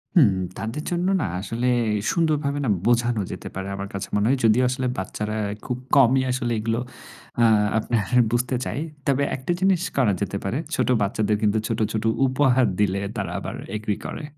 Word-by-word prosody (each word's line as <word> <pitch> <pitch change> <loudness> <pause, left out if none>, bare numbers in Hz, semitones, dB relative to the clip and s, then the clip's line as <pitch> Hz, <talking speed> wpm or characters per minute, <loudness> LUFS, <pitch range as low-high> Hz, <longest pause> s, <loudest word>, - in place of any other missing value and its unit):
হুম। 130 - +6 0.2
তাদের 115 +7 -4
জন্য 175 +1 0
না - - 0
আসলে 115 +5 -2 0.4
সুন্দরভাবে 150 -4 0
না - - 0 0.2
বোঝানো 120 -2 +2
যেতে - - -7
পারে 95 0 -4
আমার 100 0 -5
কাছে 100 - -4
মনে 105 0 +2
হয়। 135 - +3
যদিও 115 +3 +4
আসলে 130 0 -1
বাচ্চারা 105 +3 -3 0.3
খুব 125 - -2 0.2
কমই 130 -1 +5
আসলে 125 -1 -1
এগুলো 115 +1 -1 0.6
আ - - +6 0.3
আপনার 110 -1 0 0.3
বুঝতে 125 +2 0
চায়। - - -3 0.3
তবে 140 0 +2
একটা 130 +6 -3
জিনিস 190 -2 +3 0.2
করা 125 -7 +4
যেতে 100 0 -2
পারে। 95 +6 -1 0.2
ছোট - - 0
বাচ্চাদের 105 +1 +1
কিন্তু 105 0 +2
ছোট, 115 - -2
ছোট 110 - -1 0.2
উপহার 130 -1 +3
দিলে 100 -1 +1
তারা 95 -4 -3
আবার - - -6 0.2
এগ্রি 105 -1 -2
করে। - - -5
120 Hz, 175 wpm, -23 LUFS, 105-135 Hz, 0.6 s, হুম